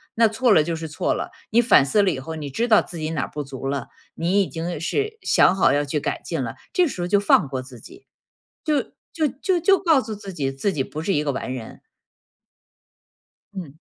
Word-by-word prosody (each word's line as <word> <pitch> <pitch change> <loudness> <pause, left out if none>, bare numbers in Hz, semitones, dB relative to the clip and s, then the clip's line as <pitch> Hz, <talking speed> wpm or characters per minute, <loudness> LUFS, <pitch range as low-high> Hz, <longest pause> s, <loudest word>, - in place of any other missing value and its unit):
那 230 0 +5
错 225 +3 +1
了 165 - +6
就 165 +2 -2
是 160 0 -6
错 150 - -1
了， - - -4 0.2
你 235 +2 +5
反 230 - +5
思 175 +10 +3
了 190 - +3
以 135 - -4
后， 160 +5 -6
你 150 -3 -5
知 230 - -1
道 220 -3 +6
自 175 - -9
己 155 0 -3
哪 155 -4 -1
儿 - - -4
不 150 -1 -5
足 135 -1 -8
了， 135 -2 -2 0.3
你 180 +5 +2
已 - - -6
经 170 +1 -4
是 425 - -1
想 180 - +4
好 190 - +4
要 145 0 +1
去 145 +1 -2
改 - - -2
进 - - -3
了， - - -5 0.2
这 360 - +4
时 280 - -5
候 175 - -1
就 205 - +3
放 200 -7 +4
过 130 -1 -4
自 130 -2 -12
己。 385 +2 -15 0.6
就 300 -3 +2 0.3
就 315 -3 +1
就 375 -2 +2
就 385 +3 +4
告 325 -6 +4
诉 225 - -6
自 200 -1 -8
己， 140 -5 -2
自 135 +9 -1
己 135 - 0
不 155 - -6
是 180 - -1
一 150 - +1
个 145 - 0
完 130 -1 -4
人。 115 -3 -9 1.8
嗯。 170 -8 -7
170 Hz, 255 characters per minute, -23 LUFS, 145-225 Hz, 1.8 s, 了